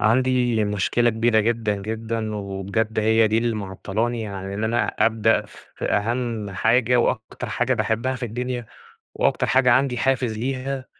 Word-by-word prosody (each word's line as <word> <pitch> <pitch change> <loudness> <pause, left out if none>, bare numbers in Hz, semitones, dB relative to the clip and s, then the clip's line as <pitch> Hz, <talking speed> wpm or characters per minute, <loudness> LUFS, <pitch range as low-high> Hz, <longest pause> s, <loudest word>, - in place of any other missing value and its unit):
عندي 120 0 +2
مشكلة 105 +4 +1
كبيرة 110 0 +2
جدًا، 110 -1 0
جدًا، 110 0 -3
وبجد 100 +2 -2
هي 110 +1 +4
دي 110 +1 +2
اللي 115 -1 0
معطلاني 110 +3 -3
عن 95 -1 -6
اللي 105 +2 -1
أنا 115 +2 +1
أبدأ 110 -1 +2
في - - -11
أهم 115 -1 -1
حاجة 115 +5 +2
وأكتر 115 -2 -1
حاجة - - 0
باحبها 115 +4 -1
في 125 - -9
الدنيا، 125 +1 -4 0.5
وأكتر - - +1
حاجة 130 -1 +4
عندي 130 0 +2
حافز 125 -3 0
ليها، 130 +2 -3
115 Hz, 145 wpm, -23 LUFS, 110-120 Hz, 0.5 s, هي